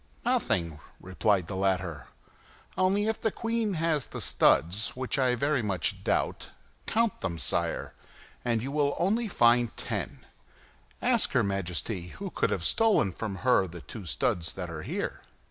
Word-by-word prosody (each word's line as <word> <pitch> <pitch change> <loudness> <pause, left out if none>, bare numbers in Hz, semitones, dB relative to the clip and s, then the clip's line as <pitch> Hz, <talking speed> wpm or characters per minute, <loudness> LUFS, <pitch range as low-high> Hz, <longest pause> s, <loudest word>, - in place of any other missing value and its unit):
"Nothing," 110 - +1 0.2
replied 95 0 +1
the 95 - -5
latter; 95 -4 -1 0.7
"only, 195 +3 +2
if 220 - -1
the 220 - +2
queen 225 -2 -1
has 160 -4 +1
the - - -6
studs, 95 +8 +3
which 130 +2 -2
I 125 -2 +3
very 140 +2 +1
much 95 -6 -2
doubt, - - 0 0.4
count 230 -1 +1
them, 85 -3 -2
sire, 80 - -2 0.5
and 115 -2 +1
if - - -6
you 140 +1 0
only 220 +6 +1
find 120 - +3
ten, - - -4 0.8
ask - - +2
her - - +4
Majesty 95 -1 -2
who - - -5
can - - +1
have - - -1
stolen 215 - +3
from 100 +2 -4
her 125 -7 +4
the 85 -1 -9
two 100 -1 -8
studs 80 +1 0
that 90 -3 -5
are 80 -2 -5
here." - - -4
115 Hz, 155 wpm, -29 LUFS, -, 0.8 s, her